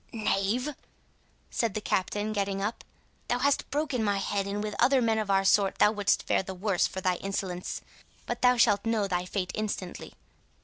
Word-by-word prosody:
"Knave!" 220 +4 0 0.8
said 230 -4 -1
the - - 0
Captain, 205 +2 -1
getting 200 -1 -1
up, 210 +4 -3 0.4
"thou 245 - +1
hast 280 +2 +1
broken 285 -5 -1
my 205 -1 +1
head; 195 0 -1
and 205 +1 -2
with 210 0 -3
other 265 +2 +5
men 225 -2 +2
of 215 -2 -3
our 195 0 +3
sort 195 0 +3
thou 210 - +5
wouldst 205 -2 +1
fare - - +1
the 190 0 -7
worse 190 -1 +1
for 190 - -6
thy 185 -1 +1
insolence. 190 -2 -4 0.4
But - - -4
thou 250 0 +5
shalt 205 -3 +4
know 225 -3 +1
thy 180 -1 -1
fate 185 0 -3
instantly. 200 -4 -4
205 Hz, 185 wpm, -28 LUFS, 195-225 Hz, 0.8 s, other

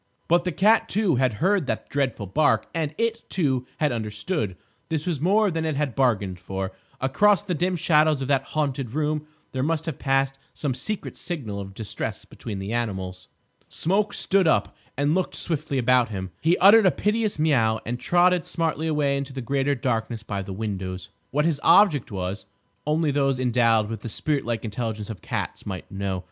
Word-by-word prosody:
But 175 +1 +3
the 180 - 0
cat, 215 +7 +3
too, 195 - +2
had 130 -2 +2
heard 185 - +1
that - - -2
dreadful 135 -7 -1
bark; 145 +11 +2
and 155 -2 -2
it, 230 0 -1
too, 130 -8 0
had 150 -3 +1
understood. 105 - -3 0.3
This 160 -2 -2
was 165 -6 -2
more 205 +4 +3
than 165 -1 -2
it 160 -2 -1
had 140 -3 -1
bargained 105 -9 +1
for. 95 +1 -4 0.3
Across 195 +10 +3
the 180 - -2
dim 180 +3 0
shadows 155 -3 +3
of - - -4
that 135 -2 +3 0.2
haunted 135 -5 -1
room 150 0 -1 0.2
there 130 - -2
must 160 +2 0
have 160 -5 -4
passed 135 0 +1 0.2
some 140 -4 -1
secret 195 - -3
signal 125 - -4
of 95 -1 -8
distress 110 -1 -4
between 105 -3 -7
the 95 +3 -4
animals. 95 -6 -3 0.4
Smoke 200 +5 +1
stood 190 -2 +2
up - - +2 0.2
and 145 +2 +2
looked 185 0 -1
swiftly 155 -4 -2
about 125 -1 +3
him. 95 -3 -5
He 165 +3 +3
uttered 205 +2 +7
a - - +8
piteous 215 -2 0
meow 120 -8 +2
and 120 +2 -3
trotted 180 +2 +3
smartly 160 -1 -1
away 145 -3 +1
into 140 0 -5
the 135 - -5
greater 140 +3 0
darkness 115 -3 -2
by 100 -3 -3
the 95 - -7
windows. 95 -3 -4 0.2
What 150 +3 +1
his 155 -4 0
object 165 - +5
was 95 +1 -4 0.4
only 155 0 +2
those 135 -2 +1
endowed 115 -3 +3
with 110 -1 -5
the 115 - -5
spirit 145 +5 -1
like 120 0 -2
intelligence 110 -1 -4
of 105 - -9
cats - - -4
might 95 -2 -6
know. 95 -1 -2
135 Hz, 185 wpm, -25 LUFS, 110-160 Hz, 0.4 s, a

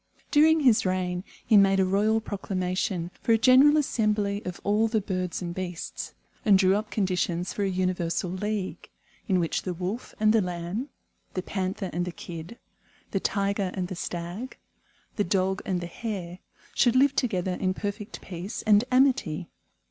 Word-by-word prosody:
During 315 +1 +5
his 250 -6 +5
reign 185 -1 -1 0.2
he 215 - +5
made 195 -1 +5
a 190 - +4
royal 210 +4 +2
proclamation 185 -3 -2
for 230 - +3
a - - +5
general 260 +6 +6
assembly 210 -7 +1
of 180 - -5
all 210 +2 +2
the 220 0 +1
birds 185 -2 -3
and 170 -1 -4
beasts, 180 -2 -5 0.3
and 205 -3 +6
drew 190 0 +4
up 210 +1 -2
conditions 180 -3 -1
for - - -3
a 195 - +1
universal 180 -1 -1
league, 200 +1 -3 0.4
in 190 -4 +3
which 165 -2 0
the 180 -2 -4
Wolf 185 +7 -5
and 215 0 +4
the 225 - +4
Lamb, 180 +8 -4 0.5
the 185 - -2
Panther 190 0 -3
and 175 +2 -1
the 180 - -4
Kid, 170 +6 -8 0.5
the 195 - 0
Tiger 200 -1 0
and 180 -2 -2
the 185 - -4
Stag, 175 +8 -5 0.6
the 205 - +2
Dog 190 0 0
and 180 -2 0
the - - -4
Hare, 180 -2 -5 0.3
should 245 -1 +3
live 275 +1 +4
together 190 -8 0
in 185 +1 -1
perfect 205 +1 -5
peace 185 +4 -6
and 210 -1 +5
amity. 255 - +2
195 Hz, 170 wpm, -27 LUFS, 180-215 Hz, 0.6 s, general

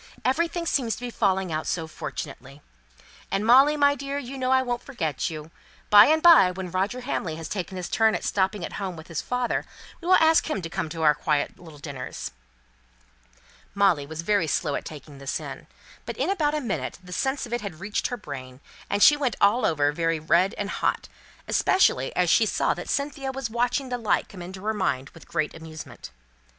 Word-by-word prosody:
Everything 335 +5 0
seems 240 -9 0
to - - -12
be 245 -1 -4
falling 190 -5 0
out 155 0 -2
so 165 -1 -1
fortunately. 140 -2 -8 0.7
And 195 +2 -1
Molly, 270 +6 +6
my 285 -1 +5
dear, 280 0 -4
you 275 -1 -6
know 255 -1 -2
I 260 0 +4
won't 245 -1 -2
forget 165 - -3
you. 155 0 -8 0.4
By 205 0 +10
and 315 +1 +3
by, 330 - +8
when 180 -1 -6
Roger 195 +7 -1
Hamley 185 - -3
has 160 0 -6
taken 185 0 -4
his 180 - -4
turn 220 -1 +3
at - - -4
stopping 190 -1 0
at - - -8
home 190 -2 -3
with 160 0 -12
his 165 - -3
father, 250 -1 -1 0.4
we 340 - -7
will 370 - +7
ask 320 -1 +4
him 305 - -1
to 165 - -4
one - - -1
of 155 - -8
our 160 -2 +3
little - - -25
quiet 150 +1 -2
dinners." 135 -4 -6 1.4
Molly 185 -8 +3
was 160 +2 -6
very 200 -3 +2
slow 150 -1 0
at - - -3
taking 145 -2 -10
this 135 -1 -3
in; - - -8 0.4
but - - -5
in - - 0
about 305 -6 +1
a 300 - -1
minute 230 -7 -3
the 180 0 -9
sense 265 +6 -1
of 240 - -8
it 240 - -1
had 195 -6 -7
reached 205 +2 -2
her 245 - -4
brain, 130 - -8 0.3
and 200 0 +2
she 295 - +8
went 275 -5 -1
all 215 +3 +4
over 145 -3 +2
very 165 +1 0
red 175 +6 +2
and 205 0 -3
hot; - - -1 0.4
especially 380 - +3
as - - +2
she - - +4
saw - - +1
that - - -8
Cynthia 280 -1 -2
was 265 -4 -4
watching 245 +3 0
the 245 -1 -2
light 225 - 0
come 185 - -10
into 185 +2 -8
her 220 - +1
mind 140 -10 -1
with 165 - -16
great 155 - -1
amusement. 160 - -10
200 Hz, 210 wpm, -25 LUFS, 160-255 Hz, 1.4 s, By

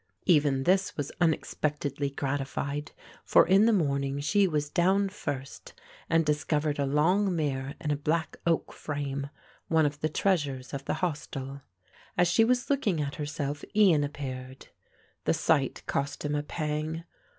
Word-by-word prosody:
Even 145 -5 +3
this 190 +5 +2
was 145 -2 -3
unexpectedly 150 -3 0
gratified, 140 +1 -3 0.3
for - - +5
in 195 +4 +6
the - - +5
morning 140 -7 +1
she 195 +7 +3
was 150 -3 -1
down 190 +5 +2
first 140 -8 -6 0.3
and 165 -1 +3
discovered 150 0 0
a 140 - +1
long 180 +7 +2
mirror 140 -3 -2
in 150 -3 -2
a - - +2
black 155 +3 -1
oak 165 -1 +1
frame, 140 -2 -4 0.4
one 160 -1 +3
of 145 0 -2
the 155 - +1
treasures 145 -8 0
of 140 0 -4
the - - -1
hostel. 140 -4 -5 0.6
As 175 0 +4
she 185 +6 +4
was 245 +2 +2
looking 215 - +1
at 140 -1 -3
herself 145 -1 -3
Ian 185 -9 +5
appeared. 130 -2 -6 0.6
The - - +3
sight - - +1
cost 140 +1 -2
him 145 - -1
a 145 - +1
pang. 155 +1 -3
150 Hz, 150 wpm, -28 LUFS, 140-170 Hz, 0.6 s, in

